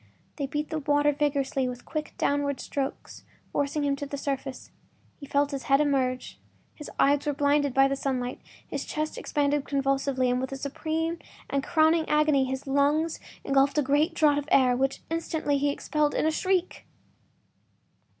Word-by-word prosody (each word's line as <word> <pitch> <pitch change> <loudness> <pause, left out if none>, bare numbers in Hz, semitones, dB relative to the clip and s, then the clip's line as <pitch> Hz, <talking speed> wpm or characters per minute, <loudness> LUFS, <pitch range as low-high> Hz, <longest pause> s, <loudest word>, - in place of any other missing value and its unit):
They 280 -3 -2
beat 295 +2 -3
the 315 - -1
water 290 0 +2
vigorously 280 -2 0
with 245 0 -8
quick, 305 -1 -5
downward 285 -1 0
strokes, 275 -1 -5 0.3
forcing 285 +1 -1
him 280 -1 +1
to 285 - -5
the 285 - -5
surface. 275 -1 -4 0.5
He 285 - -9
felt 285 +1 +1
his 270 -3 -5
head 275 +2 +4
emerge; 265 -4 0 0.3
his 300 - -9
eyes 285 +1 +3
were 295 - +1
blinded 285 0 +2
by 270 0 +6
the 275 - -1
sunlight; 255 -2 -3 0.3
his - - -4
chest 310 0 -3
expanded 290 -1 0
convulsively, 275 -2 0
and 250 0 0
with 260 - -4
a 270 - -4
supreme 320 +4 -2 0.3
and 275 -1 0
crowning 320 +1 +3
agony 300 -3 +3
his 265 +1 -4
lungs 290 +4 +1 0.2
engulfed 275 +1 +2
a 295 - +4
great 290 +5 +2
draught 295 -2 +4
of 290 +1 -8
air, 255 -2 +5
which 270 +2 -1
instantly 320 -3 -1
he 285 +1 +2
expelled 295 +1 0
in - - +1
a 315 - +3
shriek! 370 +2 -1
285 Hz, 170 wpm, -27 LUFS, 275-300 Hz, 0.5 s, by